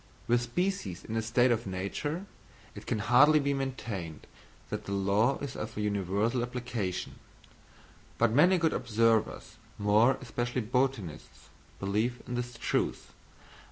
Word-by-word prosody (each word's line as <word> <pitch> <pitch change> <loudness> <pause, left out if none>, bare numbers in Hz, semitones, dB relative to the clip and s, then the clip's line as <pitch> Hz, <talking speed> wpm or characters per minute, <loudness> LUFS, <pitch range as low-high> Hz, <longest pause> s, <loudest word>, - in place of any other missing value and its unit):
With 120 0 +3
species 120 - -2
in 115 - -5
a 115 - +1
state 120 +3 +3
of 115 -3 0
nature 125 - -3 0.5
it - - -11
can - - 0
hardly 140 +9 +5
be 140 0 0
maintained 120 - -4 0.5
that - - -4
the - - -6
law 100 +6 +2
is 140 -4 -6
of 110 0 -6
universal 105 +3 0
application; 120 -6 -4 1.0
but 115 -1 +3
many 175 +10 +5
good 165 -2 +2
observers, 115 -2 +1 0.2
more 110 +6 +4
especially 120 0 -2
botanists, 115 - -2 0.3
believe 110 +5 -1
in 125 - -4
its 120 -1 -4
truth. - - -1
120 Hz, 130 wpm, -30 LUFS, 105-130 Hz, 1.0 s, hardly